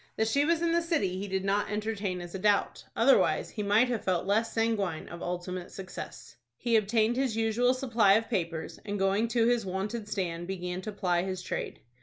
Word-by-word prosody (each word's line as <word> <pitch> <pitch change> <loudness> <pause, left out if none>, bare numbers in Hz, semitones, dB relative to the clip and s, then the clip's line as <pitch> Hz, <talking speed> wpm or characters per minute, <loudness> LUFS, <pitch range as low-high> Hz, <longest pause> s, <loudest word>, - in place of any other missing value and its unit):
That 220 - +1
she 280 +6 +2
was 335 +1 +2
in 335 - +2
the 340 +1 +3
city 210 - 0
he 200 - -4
did 190 0 -2
not 200 +1 +1
entertain 210 -3 -2
a 175 - -6
doubt. 200 +3 0
Otherwise, - - +3
he 215 - -4
might 210 +4 +4
have 235 -3 -2
felt 185 -2 0
less 215 +4 +1
sanguine 210 -7 -1
of 170 - -9
ultimate 180 0 -4
success. 185 -8 -8 0.2
He 235 - +1
obtained 220 +2 +2
his 260 -4 0
usual 230 +3 +2
supply 235 -6 +3
of 225 +2 +2
papers, 165 -7 -3
and 205 -1 -3
going 195 +3 +2
to 230 0 +2
his 240 -1 +2
wonted 200 +4 -3
stand 175 -4 -3
began 180 -1 -4
to 215 - -5
ply 180 -4 0
his 185 0 -4
trade. - - -4
205 Hz, 200 wpm, -29 LUFS, 185-225 Hz, 0.2 s, might